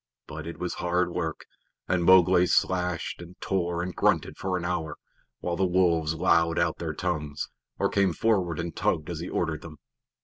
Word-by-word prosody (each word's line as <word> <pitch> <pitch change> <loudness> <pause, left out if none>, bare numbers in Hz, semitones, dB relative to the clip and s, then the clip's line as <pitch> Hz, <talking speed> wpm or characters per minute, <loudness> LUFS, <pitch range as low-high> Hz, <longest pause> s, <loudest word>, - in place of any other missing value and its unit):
But 80 +1 -7
it 85 - -6
was 90 - -3
hard 90 0 0
work, - - -3 0.4
and 90 -2 +1
Mowgli 90 0 +6
slashed 90 -2 0
and 85 +2 -12
tore 85 -2 -1
and 90 0 -5
grunted - - +1
for 95 -1 -2
an 90 - -4
hour, 80 -4 -2 0.4
while 85 - -1
the 95 - 0
wolves 85 -3 +2
lolled 85 0 +3
out 85 -1 +1
their 80 -2 -3
tongues, 75 -5 -3 0.3
or - - +2
came 100 -2 +2
forward 90 -4 +1
and 85 0 -4
tugged 75 +2 0
as 85 - -4
he 85 - -5
ordered 80 -3 -1
them. 80 -2 -10
85 Hz, 180 wpm, -27 LUFS, 80-90 Hz, 0.4 s, Mowgli